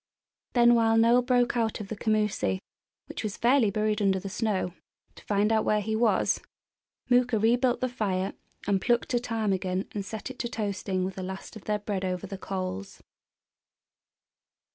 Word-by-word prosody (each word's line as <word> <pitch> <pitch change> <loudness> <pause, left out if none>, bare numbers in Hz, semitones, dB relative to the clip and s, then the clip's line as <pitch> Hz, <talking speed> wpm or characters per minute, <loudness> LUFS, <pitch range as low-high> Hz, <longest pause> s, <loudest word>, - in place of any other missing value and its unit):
Then 240 -1 +6
while 225 -1 +4
Noel 235 +2 +5
broke 245 -1 +2
out 225 -2 0
of 205 -2 -7
the 220 - -3
commoosie, 210 - 0 0.5
which - - -6
was 210 -2 -3
fairly 240 -2 +4
buried 215 +1 0
under 195 -1 +2
the 195 - -6
snow, 200 -4 -1 0.4
to - - -15
find 205 +1 +2
out 220 -1 +3
where 210 - +2
he 220 +1 -2
was, 220 -3 +2 0.7
Mooka 245 -2 +3
rebuilt 240 +3 +2
the 255 - +2
fire 200 -6 -1 0.3
and 195 -2 +1
plucked 240 0 +1
a 240 - +3
ptarmigan 195 -5 -1
and 205 - -3
set 220 +5 -6
it 260 - -13
to 235 - -2
toasting 200 -4 -2
with 190 - -4
the 185 - -6
last 190 +4 -7
of 215 - -11
their 210 0 +1
bread 205 -2 -3
over 180 -1 -2
the 195 -2 -7
coals. 185 - -5
215 Hz, 175 wpm, -28 LUFS, 195-235 Hz, 0.7 s, Then